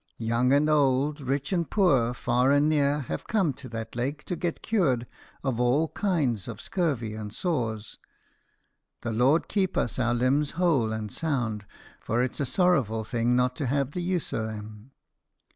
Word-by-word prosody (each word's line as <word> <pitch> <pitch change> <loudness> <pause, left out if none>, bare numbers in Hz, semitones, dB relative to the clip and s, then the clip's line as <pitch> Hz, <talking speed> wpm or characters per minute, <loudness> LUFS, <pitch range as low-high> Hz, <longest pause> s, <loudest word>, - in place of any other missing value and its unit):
Young 115 +2 +1
and 145 +2 +4
ould, 145 0 +2
rich 140 +4 -1
and 170 -3 0
poor, 135 - +3
far 125 +2 +2
and 145 +1 +4
near, 145 -1 +2
have 80 - -5
come 190 -10 +1
to 130 0 -10
that 115 -1 -6
lake 135 +5 -2
to 180 - -3
get 170 0 -3
cured 140 - +1 0.4
of 130 -4 -1
all 135 +6 +2
kinds 145 - 0
of - - -6
scurvy 140 - -1
and 105 -1 -6
sores. 115 - -3 1.0
The 115 -1 -2
Lord 130 +8 +3
keep 190 -3 0
us 120 - 0
our 120 -1 +2
limbs 135 +4 +1
whole 150 -11 +2
and 110 -1 -4
sound, 120 -10 -2 0.3
for 120 +2 0
it's 130 - -3
a 140 - 0
sorrowful 130 - +2
thing 120 +2 0
not 125 0 +2
to 140 - -2
have 140 +1 0
the 180 - -3
use 180 -1 -1
o' 110 -1 -1
them. 105 +2 -8
130 Hz, 175 wpm, -27 LUFS, 115-150 Hz, 1.0 s, and